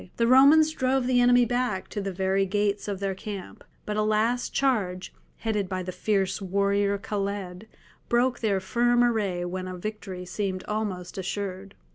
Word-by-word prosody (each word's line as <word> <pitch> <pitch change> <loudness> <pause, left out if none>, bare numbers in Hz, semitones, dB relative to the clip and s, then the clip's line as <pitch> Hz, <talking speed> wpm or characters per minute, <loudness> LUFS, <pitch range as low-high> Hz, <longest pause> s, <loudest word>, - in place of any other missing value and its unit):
The 230 - +2
Romans 280 +6 +6
drove 260 -3 0
the 250 -1 +3
enemy 245 0 +5
back 245 -5 -1
to 205 - -4
the 195 0 -3
very 190 +1 0
gates 205 +1 0
of 200 -2 -3
their 195 -1 -1
camp, 195 0 -8 0.2
but 210 0 -3
a - - +2
last 215 +3 +1
charge, 200 -10 0 0.2
headed 210 -4 -2
by 185 -1 -3
the 185 - -5
fierce 195 0 0
warrior 200 +1 +1
Khaled, 200 -1 -4 0.4
broke 245 +1 +2
their 205 -4 +1
firm 240 +5 +2
array 205 -7 0
when 185 +1 -4
a 185 0 -6
victory 190 -2 -6
seemed 185 0 -3
almost 195 -4 -4
assured. 195 0 -5
205 Hz, 165 wpm, -26 LUFS, 190-235 Hz, 0.4 s, Romans